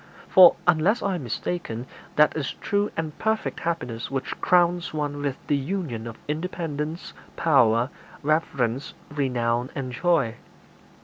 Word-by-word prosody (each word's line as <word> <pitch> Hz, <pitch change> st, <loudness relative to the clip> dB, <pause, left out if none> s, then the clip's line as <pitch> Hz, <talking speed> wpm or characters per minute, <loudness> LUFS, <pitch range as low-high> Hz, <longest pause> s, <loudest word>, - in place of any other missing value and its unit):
For, 180 Hz, -2 st, +8 dB
unless 175 Hz, +7 st, +3 dB
I 200 Hz, -, +1 dB
am 175 Hz, -6 st, -3 dB
mistaken, 120 Hz, -1 st, -3 dB, 0.3 s
that 150 Hz, 0 st, +5 dB
is 150 Hz, -3 st, -2 dB
true 205 Hz, +1 st, 0 dB
and 160 Hz, -2 st, -3 dB
perfect 220 Hz, 0 st, -1 dB
happiness 125 Hz, -9 st, -3 dB
which 135 Hz, 0 st, -4 dB
crowns 175 Hz, -2 st, +3 dB
one 145 Hz, -1 st, -2 dB
with 140 Hz, -2 st, -2 dB
the 145 Hz, -, +2 dB
union 140 Hz, -, -3 dB
of 115 Hz, -, -8 dB
independence, 160 Hz, 0 st, -4 dB, 0.2 s
power, 125 Hz, -5 st, +3 dB, 0.3 s
reverence, 140 Hz, -4 st, 0 dB, 0.2 s
renown, 125 Hz, -3 st, 0 dB
and 130 Hz, -2 st, -3 dB
joy. 135 Hz, -5 st, +1 dB
150 Hz, 130 wpm, -25 LUFS, 125-175 Hz, 0.3 s, For